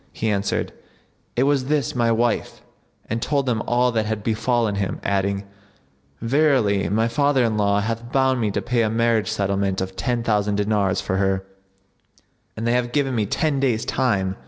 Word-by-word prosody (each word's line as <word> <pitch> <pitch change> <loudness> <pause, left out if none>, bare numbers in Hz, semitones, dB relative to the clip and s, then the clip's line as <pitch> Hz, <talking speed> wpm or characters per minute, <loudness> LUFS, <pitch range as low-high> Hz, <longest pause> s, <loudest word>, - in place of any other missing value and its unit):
He 110 -1 -1
answered, 100 -1 -1 0.6
"It 125 - +2
was 140 -2 +2
this 145 -2 0
my 120 -2 +1
wife," 115 0 -1 0.4
and 115 - -2
told 140 +2 0
them 115 -4 0
all 125 +1 +2
that 110 -2 0
had 110 -1 -3
befallen 115 0 0
him, 95 -2 -3
adding, 100 0 0 0.8
"Verily 120 -6 +2
my 110 +3 +1
father 140 +2 +2
in 115 -2 +1
law 100 -1 +2
hath 115 +2 -4
bound 130 -2 +2
me 110 - +1
to - - -2
pay 120 -1 +1
a 110 - +1
marriage 115 -1 +1
settlement 100 -2 0
of 95 0 -4
ten 120 0 -1
thousand 105 -2 +1
dinars 100 -2 +1
for 95 - -2
her, 95 0 0 1.1
and 110 - -3
they 120 - +2
have 120 -1 0
given 140 -3 +1
me 110 -4 0
ten 150 +5 0
days' 125 -5 0
time." 100 -7 0
115 Hz, 180 wpm, -22 LUFS, 100-125 Hz, 1.1 s, It